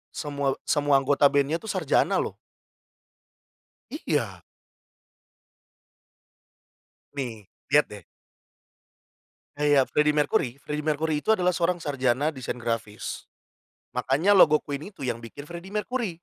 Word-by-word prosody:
semua 140 -3 -1
semua 145 -2 +3
anggota 140 +1 +4
band-nya 145 +3 +1
tuh 220 - -8
sarjana 180 -7 +2
loh. - - -3 1.6
Iya. - - -2 2.7
Nih, 115 -7 -5 0.2
lihat - - +5
deh. - - -9 1.5
Kayak 145 -2 +3
Freddie 150 0 +3
Mercury. 145 -3 +1
Freddie 150 +1 -4
Mercury 155 0 0
itu 220 +8 +3
adalah 180 -1 +2
seorang 175 +1 +1
sarjana 140 +1 +1
desain 130 -4 -5
grafis, 115 -3 -4 0.7
makanya 135 +11 +2
logo 155 -5 +7
Queen 145 +7 -6
itu 140 -10 -7
yang 115 -1 -3
bikin 145 +5 -10
Freddie 170 +3 -9
Mercury. 225 -2 -2
145 Hz, 110 wpm, -26 LUFS, 135-165 Hz, 2.7 s, logo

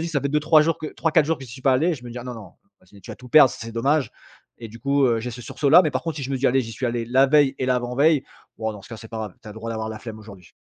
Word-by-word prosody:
dis: 165 - -3
«Ça 150 -4 -1
fait 140 - -2
2-3 150 +1 +4
jours 165 +1 0
que 155 - -6
3-4 160 -1 +1
jours 165 - 0
que 135 - -9
j'y 125 - -13
suis 130 +2 -11
pas 135 - +4
allé», 165 +7 +2
je 125 -4 -12
me 120 - -8
dis: 120 - -7
«Ah, 120 - -8
non, 125 -1 -6
non, 110 -3 -11 0.3
ah - - -26
sinon, 100 +2 -18
tu - - -10
vas - - -8
tout 125 - -14
perdre, 140 0 +7
ça - - -9
serait 115 0 -7
dommage» 135 +5 +1 0.5
et 115 - -6
du 115 +2 -12
coup, 140 +2 +1
heu, 115 -2 +1
j'ai 125 - -5
ce 120 +1 -9
sursaut-là. 145 +8 +4
Mais 155 - 0
par 130 0 -3
contre, 165 -3 -4
si 145 - -5
je 135 - -5
me 135 - 0
dis: 135 +1 0
«Allez, 135 +2 +3
j'y 115 - -8
suis 130 - -5
allé 120 -1 -2
la 130 +3 +4
veille 140 -1 +3
et - - -1
l'avant-veille, 130 +4 +2 0.3
ouah, 110 -1 -2
dans 105 -2 -11
ce - - -15
cas, 115 - -8
c'est 115 - -11
pas 115 - -7
grave! 105 -4 -6
Tu 110 - -11
as - - -8
le - - -16
droit 115 +1 -6
d'avoir 110 -1 -4
la 110 0 -6
flemme 110 -2 -9
aujourd'hui». 100 -5 -14
125 Hz, 365 wpm, -23 LUFS, 115-145 Hz, 0.5 s, perdre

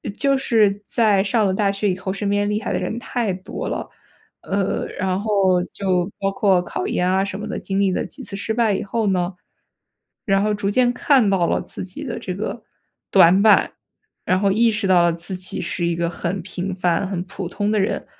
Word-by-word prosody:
就 275 +1 +2
是 210 -6 +2
在 210 -5 +2
上 215 +1 +1
了 190 - +1
大 200 0 +1
学 200 +1 -1
以 185 - -1
后， 190 0 -4
身 200 +1 -2
边 205 0 +1
厉 210 +1 -1
害 - - -3
的 - - 0
人 220 - -3
太 235 -6 -2
多 185 +2 -6
了。 - - -4 0.5
呃， 195 0 -1
然 185 0 0
后 195 -4 +2
就 185 -2 0
包 195 0 0
括 195 -2 +2
考 - - -4
研 180 0 0
啊 190 +1 +2
什 200 0 -5
么 210 - -5
的， - - -4
经 195 0 -2
历 195 -2 +3
了 - - -1
几 180 - -10
次 195 - -6
失 220 +2 -2
败 225 -3 +2
以 - - -2
后 220 +1 -1
呢， 180 -2 +1 1.0
然 195 -3 +2
后 210 - +1
逐 205 -1 -1
渐 245 +3 +3
看 260 -4 +3
到 180 -3 +2
了 - - +1
自 - - -7
己 190 +11 -7
的 250 -5 -4
这 180 -2 -5
个 215 +2 -4 0.5
短 185 0 +6
板， 215 -1 +5 0.5
然 185 - +2
后 200 0 +2
意 225 +3 +3
识 215 -1 -2
到 180 -2 +5
了 170 0 +3
自 175 +3 -5
己 185 0 -2
是 175 0 -2
一 170 - 0
个 170 0 -1
很 175 +2 -3
平 185 +1 -4
凡、 180 +1 0
很 180 -3 -3
普 180 -1 -6
通 205 +1 -1
的 215 - +2
人， 195 - -1
195 Hz, 240 characters per minute, -21 LUFS, 185-210 Hz, 1.0 s, 短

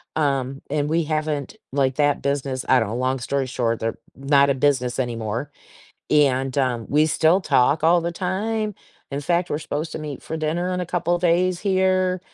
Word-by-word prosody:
um, 135 -3 0
and 150 0 0
we 165 +1 +2
haven't 155 -2 -2 0.2
like, 135 -1 +1
that 145 -1 +2
business 140 -2 -2
I 130 - +6
know, 110 +1 -2
long 130 +1 0
story 135 +2 -1
short, 115 -2 -1
they're 115 0 -2 0.2
not 140 +1 +3
a 140 - +2
business 130 -3 +1
anymore. 120 +2 -3 0.6
And, 135 -2 +2
um, 125 -4 0
we 150 +2 +3
still 160 +4 +3
talk 150 0 +2
all 170 +1 +5
the 170 +1 -2
time. 210 +4 -2 0.4
In 140 - -2
fact, 175 +4 0
we're 145 - -1
supposed 155 0 -4
to - - -4
meet 150 -3 -6
for 160 - -5
dinner 165 +4 -1
in 180 - -1
a 180 - -3
couple 175 0 0
of 175 - -2
days 180 +1 +2
here, 185 -2 +1
145 Hz, 190 wpm, -22 LUFS, 130-170 Hz, 0.6 s, I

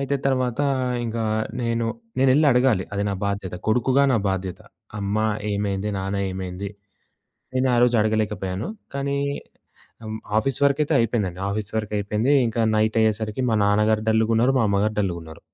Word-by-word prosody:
అయితే 140 +1 0
తర్వాత 130 -2 0 0.5
ఇంకా 115 0 -2 0.4
నేను 115 -1 0 0.3
నేనెళ్ళి 135 +3 +4
అడగాలి 125 -6 +3
అది 100 0 -1
నా - - -1
బాధ్యత. 100 -3 -3
కొడుకుగా 125 +4 +3
నా - - +3
బాధ్యత. 95 -1 -3 0.4
అమ్మ 100 +1 -2 0.4
ఏమైంది? 100 0 -1
నాన్న 95 +1 -2
ఏమైంది? 95 +1 -5 0.9
నేనారోజు 125 -2 +3
అడగలేకపోయాను. 105 - -1 0.3
కానీ 140 0 -1 0.9
ఆహ్ 110 0 -4 0.2
ఆఫీస్ 135 +3 0
వర్క్ 140 +1 +2
అయితే 155 - -1
అయిపోయిందండి. 105 -6 0
ఆఫీస్ 105 0 -3
వర్క్ 105 -1 -3
అయిపోయింది. 105 +6 0 0.2
ఇంకా 115 +1 -1 0.2
నైట్ 110 +1 +1
అయ్యేసరికి 110 +2 0
మా 110 - +2
నాన్నగారు 105 +1 +2
డల్లుగున్నారు. 115 +3 +3
మా - - +3
అమ్మగారు 105 +2 +1
డల్లుగున్నారు. 85 -5 -4
110 Hz, 140 wpm, -23 LUFS, 100-125 Hz, 0.9 s, నేనెళ్ళి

